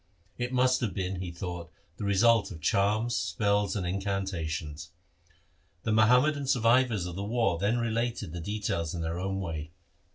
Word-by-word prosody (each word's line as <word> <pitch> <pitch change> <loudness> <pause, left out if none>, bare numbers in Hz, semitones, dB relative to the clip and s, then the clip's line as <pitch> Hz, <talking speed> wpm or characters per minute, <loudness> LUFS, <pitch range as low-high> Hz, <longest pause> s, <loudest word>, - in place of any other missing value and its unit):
It 125 0 -2
must 130 0 +3
have 115 -6 -2
been, 95 -1 -2
he 90 0 -4
thought, 85 -1 -6 0.3
the 105 - -4
result 110 +2 +4
of 85 -6 -8
charms, 105 +8 +1
spells, 100 +2 +1
and 95 -4 -2
incantations. 85 -5 -3 0.9
The 110 - 0
Muham 110 +4 +6
madan 145 -2 -1
survivors 120 -5 +3
of 90 -1 -5
the 100 - -3
war 110 -5 +1
then 105 +5 +1
related 115 -6 -2
its 85 - -5
details 100 -5 -2
in 85 - -3
their 80 +1 -2
own 95 +1 -2
way. 80 -4 -4
100 Hz, 165 wpm, -29 LUFS, 85-115 Hz, 0.9 s, Muham